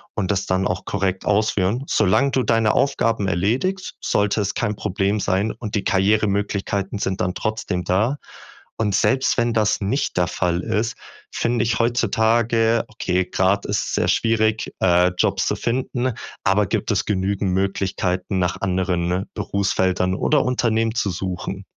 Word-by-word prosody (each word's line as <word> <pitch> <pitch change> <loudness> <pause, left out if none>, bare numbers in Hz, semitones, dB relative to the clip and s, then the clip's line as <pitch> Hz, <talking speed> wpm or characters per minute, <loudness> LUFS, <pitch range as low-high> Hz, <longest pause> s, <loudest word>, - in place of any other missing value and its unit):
und 105 -2 -1
das 100 -1 -1
dann 95 0 0
auch 95 +1 -3
korrekt 95 -2 -2
ausführen. 105 +2 +1
Solange 110 +7 +2
du 130 - +1
deine 115 -2 +2
Aufgaben 115 -7 +1
erledigst, 120 - -1
sollte 105 +1 +1
es 100 -1 -1
kein 105 -3 -1
Problem 100 +1 -1
sein, 100 +3 0
und 105 -2 -6
die 105 - 0
Karrieremöglichkeiten 100 0 0
sind 95 -2 -2
dann 90 0 0
trotzdem 110 -4 -2
da. 105 +10 +1 0.6
Und 105 -3 0
selbst 130 +5 +2
wenn 120 -1 +1
das 110 -1 +1
nicht 105 +5 -1
der 90 -1 +2
Fall 90 -1 -1
ist, 110 +5 -1 0.4
finde 115 -1 0
ich 115 0 0
heutzutage 115 0 +2
okay, 95 -3 -1
gerade 95 +2 +1
ist 105 - +1
es - - -4
sehr - - +1
schwierig, 110 -1 +1
äh, 90 0 +4
Jobs - - +1
zu - - 0
finden, 125 +1 -1 0.3
aber 100 +2 +3
gibt - - -1
es - - 0
genügend 100 -1 -1
Möglichkeiten, 95 0 -1
nach 90 -1 -1
anderen 90 -1 0
Berufsfeldern 95 -2 0
oder 145 +8 +2
Unternehmen 115 -3 +1
zu 105 - 0
suchen. 95 +2 -5
100 Hz, 155 wpm, -21 LUFS, 95-115 Hz, 0.6 s, äh